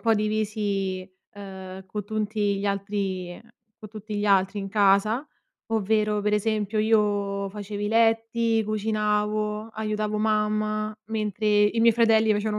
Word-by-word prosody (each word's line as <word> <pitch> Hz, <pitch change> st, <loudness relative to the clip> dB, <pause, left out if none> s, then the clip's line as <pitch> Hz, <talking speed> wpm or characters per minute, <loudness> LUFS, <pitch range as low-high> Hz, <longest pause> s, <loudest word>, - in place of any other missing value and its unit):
po' 230 Hz, -, +3 dB
divisi, 210 Hz, -3 st, -1 dB, 0.2 s
uhm, 190 Hz, -1 st, -9 dB
con 205 Hz, +2 st, -5 dB
tutti 210 Hz, -1 st, -1 dB
gli 200 Hz, -, -2 dB
altri 195 Hz, -2 st, -2 dB
ehm, 230 Hz, +6 st, -13 dB, 0.3 s
con 215 Hz, -, -10 dB
tutti 215 Hz, 0 st, -8 dB
gli 205 Hz, 0 st, -1 dB
altri 195 Hz, 0 st, +3 dB
in 195 Hz, -1 st, -4 dB
casa. 205 Hz, +6 st, +2 dB, 0.5 s
Ovvero, 215 Hz, 0 st, +1 dB
per 210 Hz, +1 st, +1 dB
esempio, 215 Hz, 0 st, -1 dB
io 205 Hz, -2 st, +1 dB
facevo 205 Hz, +1 st, -6 dB
i 205 Hz, -, -1 dB
letti, 225 Hz, 0 st, +2 dB
cucinavo, 210 Hz, 0 st, -1 dB
aiutavo 215 Hz, 0 st, -2 dB
mamma, 215 Hz, 0 st, 0 dB
mentre 215 Hz, -1 st, -2 dB
i 210 Hz, +2 st, +3 dB
miei 230 Hz, 0 st, +6 dB
fratelli 225 Hz, -1 st, +4 dB
facevano 210 Hz, 0 st, -1 dB
210 Hz, 140 wpm, -25 LUFS, 200-215 Hz, 0.5 s, miei